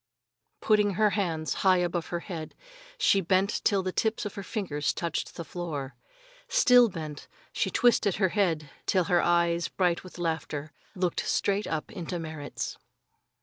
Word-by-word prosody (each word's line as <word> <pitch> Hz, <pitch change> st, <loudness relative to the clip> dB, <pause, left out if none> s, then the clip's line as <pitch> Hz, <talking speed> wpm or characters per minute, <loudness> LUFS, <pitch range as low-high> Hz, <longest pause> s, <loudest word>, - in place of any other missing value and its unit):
Putting 210 Hz, -2 st, +3 dB
her 210 Hz, +1 st, +3 dB
hands 165 Hz, -7 st, -1 dB
high 190 Hz, -1 st, +5 dB
above 175 Hz, -1 st, -1 dB
her 175 Hz, -1 st, -3 dB
head, 165 Hz, -5 st, -7 dB, 0.4 s
she 200 Hz, -, +4 dB
bent 190 Hz, +3 st, +1 dB
till 200 Hz, -3 st, +2 dB
the 185 Hz, -, -2 dB
tips 220 Hz, +3 st, 0 dB
of 205 Hz, -, -4 dB
her 200 Hz, -, -6 dB
fingers 180 Hz, -8 st, -2 dB
touched 170 Hz, -2 st, -3 dB
the 170 Hz, -, -6 dB
floor. 150 Hz, -7 st, -5 dB, 0.5 s
Still 250 Hz, -, +6 dB
bent, 155 Hz, -5 st, -7 dB, 0.3 s
she -, -, 0 dB
twisted 230 Hz, -6 st, +3 dB
her 190 Hz, -2 st, +2 dB
head 165 Hz, -8 st, 0 dB, 0.2 s
till 185 Hz, -2 st, +3 dB
her 175 Hz, +1 st, +3 dB
eyes, 170 Hz, 0 st, +2 dB
bright 180 Hz, -2 st, 0 dB
with 185 Hz, -, -12 dB
laughter, 155 Hz, -3 st, -3 dB, 0.2 s
looked 180 Hz, -2 st, 0 dB
straight 200 Hz, +1 st, +1 dB, 0.2 s
into 175 Hz, 0 st, -5 dB
Merrit's. 155 Hz, -3 st, -5 dB
175 Hz, 150 wpm, -28 LUFS, 165-200 Hz, 0.5 s, Still